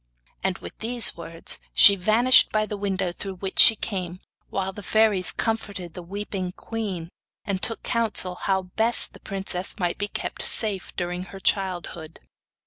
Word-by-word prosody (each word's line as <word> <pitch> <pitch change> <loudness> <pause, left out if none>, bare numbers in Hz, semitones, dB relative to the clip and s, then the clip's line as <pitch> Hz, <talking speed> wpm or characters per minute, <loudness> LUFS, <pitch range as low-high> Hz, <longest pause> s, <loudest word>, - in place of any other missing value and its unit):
And 190 -2 -1
with - - -10
these 235 +1 +2
words 165 0 -7 0.2
she 200 - +8
vanished 220 +7 +5
by 215 0 +1
the 210 - -5
window 195 -3 -2
through 190 +2 -7
which 190 +1 -4
she 220 - +9
came, 185 -4 -4 0.3
while 190 0 -3
the 205 - -9
fairies 210 -2 +2
comforted 200 -6 -3
the 180 - -8
weeping 190 0 -5
queen 195 -7 -5 0.4
and 195 -2 -2
took 225 - -3
counsel 225 -6 +1
how 190 +1 -1
best 220 +6 +4
the - - -13
princess 195 -2 -4
might 175 -4 -2
be 205 - -1
kept - - -5
safe 210 - -1
during 180 0 -3
her 195 - -11
childhood. 175 -4 -2
195 Hz, 160 wpm, -24 LUFS, 180-215 Hz, 0.4 s, she